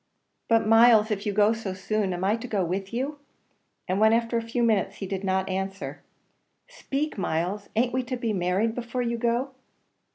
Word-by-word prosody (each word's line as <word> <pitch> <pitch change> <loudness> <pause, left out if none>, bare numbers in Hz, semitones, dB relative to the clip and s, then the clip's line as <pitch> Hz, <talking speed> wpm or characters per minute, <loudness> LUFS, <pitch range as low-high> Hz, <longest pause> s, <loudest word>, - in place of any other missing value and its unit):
"But, 225 -1 +4
Myles, 225 0 +6
if 205 +1 -2
you - - +1
go 210 +2 +4
so 215 -4 -5
soon, 205 0 -1
am 180 0 -3
I 200 +3 +2
to 230 +2 -7
go 200 -5 0
with 190 +3 -3
you?" 275 +5 -3 0.7
and 185 +1 0
when 220 +1 +5
after 230 +1 +1
a 230 - +2
few 230 +1 -2
minutes 205 -4 +1
he 195 - -6
did 195 0 -4
not 190 0 0
answer, 195 +1 -4 0.7
"Speak, 300 - -4
Myles, 180 +4 -2
an't 240 +2 +1
we 260 - +1
to 255 0 -3
be 230 -2 -1
married 190 +4 0
before 245 +1 -3
you 235 -1 -2
go?" 240 +3 0
220 Hz, 195 wpm, -26 LUFS, 195-235 Hz, 0.7 s, Myles